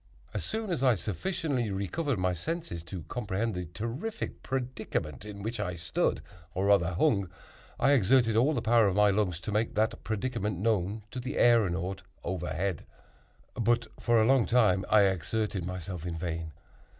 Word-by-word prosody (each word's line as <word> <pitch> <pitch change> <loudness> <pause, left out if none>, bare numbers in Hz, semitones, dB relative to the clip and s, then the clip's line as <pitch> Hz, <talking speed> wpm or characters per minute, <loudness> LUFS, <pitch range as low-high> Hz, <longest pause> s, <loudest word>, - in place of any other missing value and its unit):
As - - -2
soon 220 -2 -3
as 165 - -1
I 130 -3 +5
sufficiently 125 - -2
recovered 105 - -1
my 90 0 +1
senses 160 - -4
to 90 -1 -6
comprehend 110 0 -2
the 90 -1 -4
terrific 115 - -5
predicament 120 - -3
in 100 -1 -8
which 115 +1 -3
I 90 -4 -2
stood 85 0 0 0.3
or 95 +2 0
rather 90 -4 +3
hung, 100 - +2 0.5
I 140 - +4
exerted 120 -2 +4
all 135 +7 +3
the 120 - -1
power 115 -2 +5
of 95 - 0
my 105 0 +5
lungs 95 -5 0
to 105 - -4
make 110 +2 0
that 110 +1 0
predicament 110 -3 -2
known 105 0 0
to 130 - -5
the 125 +3 -4
æronaut 95 -5 +3 0.2
overhead. 90 0 -2 0.7
But 120 +1 +1
for 120 -1 +3
a 110 - +4
long 130 -1 +4
time 105 -6 +3
I 110 - +6
exerted 95 0 0
myself 90 -2 -5
in 85 -1 -3
vain. 80 -1 -3
105 Hz, 165 wpm, -29 LUFS, 90-120 Hz, 0.7 s, I